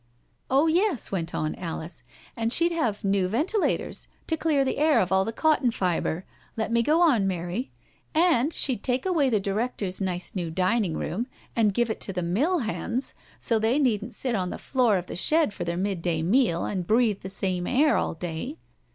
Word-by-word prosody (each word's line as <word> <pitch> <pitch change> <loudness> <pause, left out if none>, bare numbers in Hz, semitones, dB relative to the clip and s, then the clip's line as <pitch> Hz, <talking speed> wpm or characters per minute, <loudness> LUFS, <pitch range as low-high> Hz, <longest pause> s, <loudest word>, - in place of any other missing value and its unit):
'* - - -40
" - - -44
Oh 275 +4 +4
yes," 345 - +1
went 175 -3 -3
on 155 0 -1
Alice. 165 -1 -6 0.2
" - - -23
And 225 0 -1
she'd 340 +6 +3
have 240 -12 -1
new 195 -2 +2
ventilators 315 - 0 0.2
to 320 - 0
clear 300 -4 +1
the 260 - -1
air 300 -4 +4
of 185 -3 0
all 190 0 +4
the 225 - -3
cotton 300 0 +2
fibre— 180 -4 -1 0.3
let 220 +1 -1
me 235 0 +3
go 310 +8 +3
on, 245 - +4
Mary— 180 +6 -3 0.5
and 320 -4 +3
she'd 260 -9 -1
take 250 +3 -1
away 325 -8 +2
the 220 -4 +2
directors' 200 -1 -2
nice 180 -2 -2
new 175 -4 -3
dining 185 +1 +1
room 225 +9 -3 0.3
and 220 -3 +3
give 240 -2 +1
it - - -5
to 195 - 0
the 180 -1 -2
mill 260 - +1
hands, 240 +3 -2 0.2
so 225 -2 +1
that 220 - +1
they 255 - +2
needn't 240 -5 0
sit 255 -2 0
on 185 -4 -1
the - - -5
floor 245 -6 +2
of 180 - -4
the - - -7
shed 305 - +2
for 175 - -5
their 170 0 -2
midday 175 -4 -1
meal 190 -2 +2
and 185 -4 -3
breathe 220 -2 +3
the 190 - -7
same 185 -2 -2
air 295 +4 +3
all - - -1
day. 175 - -5
220 Hz, 210 wpm, -26 LUFS, 185-270 Hz, 0.5 s, Oh